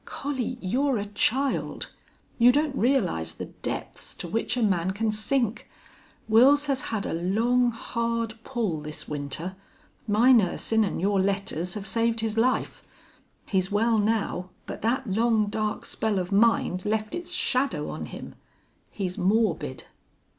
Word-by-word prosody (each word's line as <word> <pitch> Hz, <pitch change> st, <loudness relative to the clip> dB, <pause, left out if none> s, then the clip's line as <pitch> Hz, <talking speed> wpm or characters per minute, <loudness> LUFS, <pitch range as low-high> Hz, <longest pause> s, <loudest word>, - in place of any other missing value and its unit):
"Collie, 260 Hz, -3 st, -3 dB
you're 255 Hz, +7 st, +1 dB
a 205 Hz, -, -2 dB
child. 255 Hz, +6 st, 0 dB, 0.5 s
You 240 Hz, +1 st, +7 dB
don't 290 Hz, +1 st, +1 dB
realize 195 Hz, -, +1 dB
the -, -, -5 dB, 0.2 s
depths -, -, -5 dB
to -, -, -6 dB
which 225 Hz, +7 st, -1 dB
a 240 Hz, -, +1 dB
man 185 Hz, -4 st, +1 dB
can 215 Hz, +2 st, 0 dB
sink. 225 Hz, +1 st, 0 dB, 0.6 s
Wils 265 Hz, +7 st, +6 dB
has 275 Hz, -2 st, 0 dB
had 220 Hz, -3 st, -3 dB
a -, -, -2 dB
long, 225 Hz, +9 st, +2 dB
hard 230 Hz, -1 st, -2 dB
pull 215 Hz, -, -2 dB
this 150 Hz, 0 st, -6 dB
winter. 150 Hz, +5 st, -4 dB, 0.5 s
My 220 Hz, +5 st, +5 dB
nursin' 225 Hz, 0 st, +3 dB
an' 200 Hz, -, -2 dB
your 195 Hz, +2 st, +2 dB
letters 190 Hz, -3 st, -1 dB
have 205 Hz, -2 st, -5 dB
saved 230 Hz, +2 st, 0 dB
his 220 Hz, -1 st, -1 dB
life. 245 Hz, +3 st, 0 dB, 0.6 s
He's 190 Hz, -1 st, 0 dB
well, 225 Hz, +2 st, +2 dB
now, 205 Hz, -4 st, 0 dB, 0.2 s
but -, -, -7 dB
that 250 Hz, +5 st, 0 dB
long, 220 Hz, +2 st, +2 dB
dark 215 Hz, -1 st, -2 dB
spell 220 Hz, -2 st, -1 dB
of 180 Hz, +1 st, -2 dB
mind 200 Hz, -3 st, +3 dB
left 215 Hz, 0 st, -1 dB
its 350 Hz, 0 st, -5 dB
shadow 275 Hz, -6 st, 0 dB
on -, -, -6 dB
him. -, -, -9 dB, 0.6 s
He's 185 Hz, -3 st, -4 dB
morbid." 180 Hz, -, +1 dB
220 Hz, 145 wpm, -26 LUFS, 195-240 Hz, 0.6 s, You